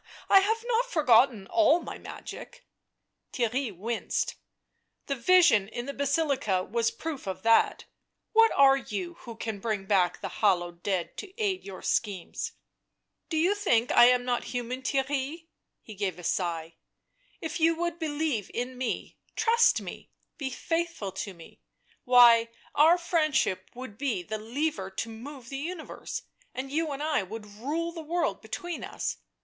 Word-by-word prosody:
" -, -, -18 dB
I 390 Hz, -, +9 dB
have 445 Hz, +4 st, 0 dB
not -, -, +2 dB
forgot 270 Hz, -, +5 dB, 0.2 s
all 330 Hz, 0 st, +5 dB
my -, -, -8 dB
magic." -, -, -9 dB, 0.7 s
Theirry 250 Hz, +1 st, 0 dB
winced. 230 Hz, +5 st, -2 dB, 0.4 s
" -, -, -50 dB
The 280 Hz, -, -1 dB
vision 275 Hz, -, +5 dB
in 240 Hz, +3 st, -5 dB
the 280 Hz, -, -5 dB
Basilica 280 Hz, -, +1 dB
was 230 Hz, +3 st, 0 dB
proof 300 Hz, -7 st, -6 dB
of 190 Hz, 0 st, -4 dB
that 230 Hz, 0 st, +3 dB, 0.2 s
— -, -, -54 dB
what 450 Hz, 0 st, +6 dB
are 275 Hz, -1 st, +6 dB
you 195 Hz, -9 st, -5 dB
who 235 Hz, -, -9 dB
can 220 Hz, -2 st, -4 dB
bring 210 Hz, -2 st, -2 dB
back 190 Hz, -3 st, +2 dB
the -, -, -4 dB
hallowed 175 Hz, -4 st, +2 dB
dead 185 Hz, -3 st, -2 dB
to 405 Hz, -, -7 dB
aid 390 Hz, -4 st, 0 dB
your 190 Hz, -2 st, -9 dB
schemes 195 Hz, -5 st, -2 dB, 0.4 s
?" -, -, -55 dB
tl -, -, -49 dB
Do 320 Hz, -, -1 dB
you 350 Hz, +6 st, +3 dB
think 250 Hz, -, +1 dB
I -, -, +8 dB
am 250 Hz, 0 st, +4 dB
not 245 Hz, -1 st, -1 dB
human, 245 Hz, +1 st, -4 dB
Theirry 270 Hz, 0 st, 0 dB
V' 290 Hz, +4 st, -3 dB, 0.3 s
He 220 Hz, -, -10 dB
gave 195 Hz, -2 st, -2 dB
a 180 Hz, -, -10 dB
sigh. 165 Hz, -2 st, -2 dB, 0.3 s
" -, -, -37 dB
If 320 Hz, -, -4 dB
you 330 Hz, +1 st, +4 dB
would 345 Hz, 0 st, -2 dB
believe 295 Hz, -, -1 dB
in 250 Hz, +1 st, -3 dB
me, 260 Hz, -, -3 dB, 0.2 s
trust 465 Hz, +1 st, +4 dB
me, -, -, -9 dB, 0.3 s
be 275 Hz, -3 st, -3 dB
faithful 330 Hz, -, -2 dB
to 195 Hz, 0 st, -6 dB
me 165 Hz, -, -15 dB, 0.2 s
— -, -, -36 dB
why, 240 Hz, -2 st, +7 dB, 0.2 s
our 320 Hz, +4 st, +6 dB
friendship 310 Hz, -, 0 dB
would 245 Hz, -4 st, -9 dB
be 260 Hz, -10 st, -1 dB
the 215 Hz, +5 st, -4 dB
lever 230 Hz, -3 st, -2 dB
to 195 Hz, +4 st, -4 dB
move 250 Hz, +3 st, -9 dB
the 275 Hz, -, -4 dB
universe, 330 Hz, +2 st, -6 dB, 0.3 s
and 265 Hz, +1 st, -4 dB
you 315 Hz, +1 st, 0 dB
and 280 Hz, +1 st, -4 dB
I 310 Hz, -5 st, +1 dB
would 210 Hz, +3 st, -7 dB
rule 285 Hz, +12 st, -3 dB
the 335 Hz, -1 st, -7 dB
world 335 Hz, +2 st, -1 dB
between 350 Hz, -2 st, -5 dB
us. -, -, -3 dB
260 Hz, 175 wpm, -28 LUFS, 215-325 Hz, 0.7 s, I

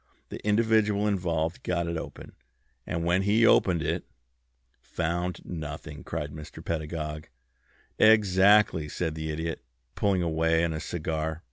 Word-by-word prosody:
The -, -, -8 dB
individual 105 Hz, -1 st, +2 dB
involved 85 Hz, -4 st, -1 dB
got 85 Hz, -1 st, -1 dB
it 85 Hz, 0 st, -3 dB
open; 80 Hz, -, -7 dB, 0.6 s
and 85 Hz, 0 st, -2 dB
when 90 Hz, +2 st, +3 dB
he 105 Hz, +4 st, +3 dB
opened 90 Hz, -7 st, +4 dB
it -, -, -1 dB, 0.5 s
" -, -, -45 dB
"Found 85 Hz, +2 st, -3 dB
nothing!" 75 Hz, -2 st, -7 dB
cried 75 Hz, -3 st, -4 dB
Mr. 75 Hz, 0 st, -10 dB
Pedagog. 75 Hz, -1 st, -4 dB, 0.7 s
"Exactly," 100 Hz, -5 st, +5 dB
said 80 Hz, +1 st, -2 dB
the 80 Hz, 0 st, -5 dB
Idiot, 80 Hz, +1 st, -4 dB, 0.3 s
pulling 95 Hz, -3 st, +1 dB
away 80 Hz, 0 st, +2 dB
on 85 Hz, -, -1 dB
his 80 Hz, 0 st, -4 dB
cigar. 80 Hz, -1 st, -3 dB
85 Hz, 135 wpm, -27 LUFS, 80-95 Hz, 0.7 s, Exactly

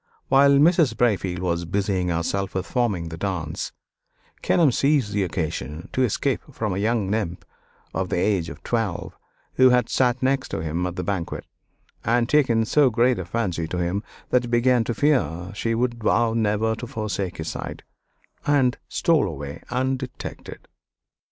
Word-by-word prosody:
While 140 Hz, +1 st, +6 dB
Mrs. 155 Hz, +1 st, +4 dB
Braefield 100 Hz, -6 st, +1 dB
was 85 Hz, -1 st, -1 dB
busying 95 Hz, 0 st, 0 dB
herself 90 Hz, +4 st, -1 dB
with 95 Hz, -, -1 dB
forming 100 Hz, -9 st, -1 dB
the 80 Hz, -, -7 dB
dance, 85 Hz, -5 st, -3 dB, 0.7 s
Kenelm 160 Hz, -6 st, +4 dB
seized 135 Hz, -5 st, +2 dB
the 100 Hz, -, +1 dB
occasion 80 Hz, -2 st, -4 dB
to 130 Hz, -, +1 dB
escape 130 Hz, +3 st, 0 dB
from 110 Hz, -6 st, -2 dB
a 95 Hz, -, -2 dB
young 110 Hz, -1 st, +1 dB
nymph 100 Hz, -5 st, -2 dB, 0.5 s
of 95 Hz, -1 st, -2 dB
the -, -, 0 dB
age 90 Hz, -2 st, +1 dB
of -, -, -11 dB
twelve, 115 Hz, -7 st, -2 dB, 0.4 s
who 130 Hz, 0 st, +7 dB
had 125 Hz, -2 st, +3 dB
sat 125 Hz, 0 st, +1 dB
next 135 Hz, 0 st, +1 dB
to -, -, -3 dB
him 85 Hz, +3 st, -1 dB
at 90 Hz, -, -5 dB
the -, -, -3 dB
banquet 95 Hz, -5 st, -3 dB, 0.6 s
and 120 Hz, +1 st, +2 dB
taken 125 Hz, -6 st, +3 dB
so 145 Hz, +3 st, +4 dB
great 120 Hz, -1 st, +2 dB
a 95 Hz, -, -4 dB
fancy 90 Hz, -5 st, -2 dB
to 90 Hz, -, -4 dB
him 90 Hz, +3 st, -1 dB, 0.3 s
that 125 Hz, -, +4 dB
he -, -, -6 dB
began 120 Hz, 0 st, +3 dB
to 120 Hz, -, -2 dB
fear 100 Hz, -, +1 dB
she 115 Hz, +2 st, -1 dB
would 120 Hz, 0 st, -1 dB
vow 115 Hz, +1 st, +3 dB
never 110 Hz, 0 st, +1 dB
to 120 Hz, -, -6 dB
forsake 100 Hz, -5 st, -3 dB
his 80 Hz, 0 st, -4 dB
side, -, -, -6 dB, 0.6 s
and 135 Hz, -4 st, +3 dB
stole 165 Hz, -, +2 dB
away 70 Hz, -4 st, -6 dB
undetected. 130 Hz, +1 st, -4 dB
110 Hz, 165 wpm, -24 LUFS, 90-125 Hz, 0.7 s, who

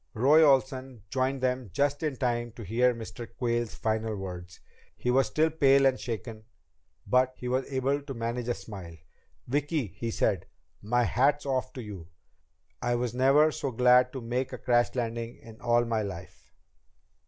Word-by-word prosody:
Roy 140 Hz, +8 st, +5 dB
Olsen 130 Hz, -4 st, +1 dB
joined 130 Hz, +1 st, 0 dB
them 125 Hz, -3 st, -1 dB
just 145 Hz, +8 st, 0 dB
in 155 Hz, -4 st, -1 dB
time 120 Hz, -2 st, -1 dB
to 115 Hz, -, -9 dB
hear 125 Hz, +4 st, +2 dB
Mr. 115 Hz, +1 st, -8 dB
Quayle's 120 Hz, -2 st, -1 dB
final 110 Hz, 0 st, -1 dB
words. 90 Hz, -2 st, -7 dB, 0.4 s
He 125 Hz, -, 0 dB
was 135 Hz, +2 st, +3 dB
still 160 Hz, +1 st, +1 dB
pale 140 Hz, -3 st, +4 dB
and 130 Hz, -1 st, +3 dB
shaken, 115 Hz, -2 st, -6 dB, 0.6 s
but 130 Hz, 0 st, +2 dB
he 125 Hz, -, -6 dB
was 130 Hz, +2 st, -1 dB
able 135 Hz, +2 st, 0 dB
to 140 Hz, -1 st, -7 dB
manage 115 Hz, +1 st, -3 dB
a 120 Hz, -, 0 dB
smile. 90 Hz, -6 st, -9 dB, 0.5 s
"Vicki," 145 Hz, +2 st, 0 dB
he 110 Hz, +5 st, -6 dB
said, 100 Hz, -4 st, 0 dB, 0.3 s
"my 120 Hz, +4 st, +1 dB
hat's 145 Hz, +5 st, +2 dB
off 130 Hz, -2 st, -1 dB
to 125 Hz, -, -7 dB
you. 100 Hz, -6 st, -9 dB, 0.7 s
I 120 Hz, 0 st, +1 dB
was 120 Hz, -1 st, -2 dB
never 135 Hz, +5 st, +4 dB
so 140 Hz, -, -3 dB
glad 125 Hz, +1 st, +4 dB
to 130 Hz, -, -5 dB
make 125 Hz, +3 st, -2 dB
a -, -, -5 dB
crash 120 Hz, 0 st, +1 dB
landing 115 Hz, -1 st, -3 dB
in 110 Hz, -1 st, -14 dB
all 120 Hz, 0 st, +3 dB
my 115 Hz, -2 st, 0 dB
life." 95 Hz, -4 st, -8 dB
125 Hz, 170 wpm, -28 LUFS, 115-135 Hz, 0.7 s, Roy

